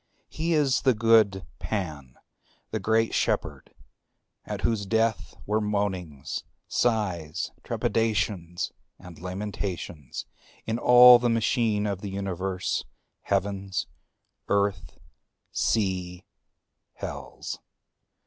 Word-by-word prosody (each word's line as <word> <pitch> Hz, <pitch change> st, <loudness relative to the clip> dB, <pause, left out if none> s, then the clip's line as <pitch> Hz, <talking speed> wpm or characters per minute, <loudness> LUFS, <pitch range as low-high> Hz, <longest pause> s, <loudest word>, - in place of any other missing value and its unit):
He 165 Hz, +2 st, -1 dB
is 145 Hz, -4 st, +3 dB
the 130 Hz, -3 st, +3 dB
good 105 Hz, -3 st, +4 dB
Pan, 75 Hz, -, -4 dB, 0.5 s
the -, -, -1 dB
great 115 Hz, 0 st, +2 dB
Shepherd.... -, -, -1 dB, 0.7 s
at -, -, -4 dB
whose 105 Hz, -4 st, 0 dB
death 110 Hz, +1 st, 0 dB
were 105 Hz, +1 st, +1 dB
moanings, 95 Hz, -9 st, -2 dB, 0.2 s
sighs, 95 Hz, -10 st, 0 dB
trepidations 100 Hz, -6 st, -1 dB, 0.3 s
and 90 Hz, -3 st, -12 dB
lamentations 90 Hz, -6 st, -5 dB, 0.4 s
in 110 Hz, +1 st, -1 dB
all 125 Hz, 0 st, +9 dB
the 120 Hz, 0 st, +1 dB
machine 115 Hz, -2 st, +1 dB
of 100 Hz, -2 st, -2 dB
the 100 Hz, -, -4 dB
universe, 95 Hz, -1 st, -2 dB, 0.4 s
heavens, 95 Hz, -1 st, -1 dB, 0.6 s
earth, 100 Hz, -6 st, 0 dB, 0.5 s
sea, 95 Hz, -4 st, 0 dB, 0.7 s
hells. -, -, -6 dB
100 Hz, 90 wpm, -27 LUFS, 90-115 Hz, 0.7 s, all